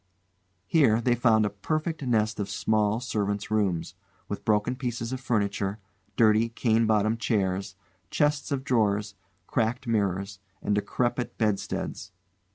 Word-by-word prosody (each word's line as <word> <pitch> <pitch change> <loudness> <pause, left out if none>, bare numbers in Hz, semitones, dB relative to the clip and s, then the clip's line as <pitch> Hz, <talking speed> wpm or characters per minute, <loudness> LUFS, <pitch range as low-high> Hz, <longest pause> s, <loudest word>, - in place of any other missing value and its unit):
Here 130 -9 +4
they 120 +1 +2
found 115 -3 +3
a 105 - -1
perfect 155 +10 -2
nest 110 -5 +1
of 100 -1 -2
small 110 0 +1
servants' 105 -4 -2
rooms, 100 -6 0 0.3
with - - -5
broken 105 +3 +1
pieces 120 -2 -3
of 130 - -3
furniture, 100 -4 -1 0.4
dirty 110 0 +4
cane 115 -1 +1
bottomed 110 +1 +2
chairs, 95 -3 -1 0.3
chests 150 -2 +1
of 135 -2 -1
drawers, 105 -5 +1 0.3
cracked 120 +5 -1
mirrors, 100 -3 -1 0.2
and 105 - -1
decrepit 120 +4 -1
bedsteads. 100 -2 -2
110 Hz, 130 wpm, -27 LUFS, 105-120 Hz, 0.4 s, Here